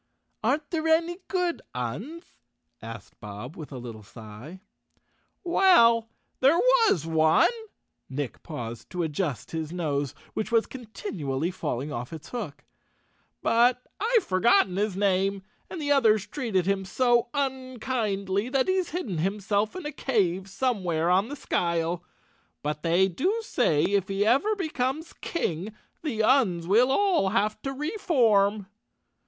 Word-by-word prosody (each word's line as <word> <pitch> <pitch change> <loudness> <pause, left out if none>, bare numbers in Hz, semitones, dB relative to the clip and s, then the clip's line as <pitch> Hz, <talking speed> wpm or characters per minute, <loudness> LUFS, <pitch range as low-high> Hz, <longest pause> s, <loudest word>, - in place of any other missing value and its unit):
"Aren't 285 +6 0
there 325 -2 -1
any 335 +2 +2
good 360 -2 -1
Uns?" 195 - -4 0.6
asked 115 -3 -10
Bob 105 +7 -8
with 155 -2 -9
a 130 - -6
lit¬ 120 -1 -7
tle 110 -1 -11
sigh. 110 - -11 0.4
" - - -45 0.2
Well, 230 -12 +6 0.3
there 275 +6 +5
was 460 - +4
one," 160 - +4 0.6
Nick 135 -3 -4
paused 120 -8 -7
to 180 -1 -2
adjust 155 -3 -3
his 160 -1 -4
nose, 145 -6 -2 0.2
which 220 - -3
was 230 -1 +3
continually 180 - -4
falling 150 -5 -3
off 120 +1 -5
its 160 -2 -9
hook, 165 -12 -6 0.8
"but 245 +2 +3
I've 455 +1 +3
forgotten 185 -1 +3
his 200 -1 -1
name, 195 0 +1 0.3
and 360 - -6
the 290 -2 -1
others 220 -7 +4
treated 220 - -1
him 195 0 0
so 240 +4 +2
un¬ 260 -3 -2
kindly 205 -3 -1
that 260 0 +1
he's 375 -2 +1
hidden 245 - -3
himself 205 - 0
in 370 -4 -6
a 295 - -3
cave 195 - 0
somewhere 185 -8 0
on 190 +4 +3
the 290 - -6
skyle. 170 - -1 0.6
But 150 0 -2
they 175 +3 +3
do 380 - -1
say 160 - +2
if 195 -2 +1
he 195 +1 0
ever 275 - +3
becomes 310 -4 -2
king, 200 - -3 0.3
the 235 -9 -1
Uns 215 -9 +3
will 230 +8 +4
all 360 - +3
have 210 +1 0
to 270 - -3
reform." 240 - +2
205 Hz, 145 wpm, -27 LUFS, 165-265 Hz, 0.8 s, Well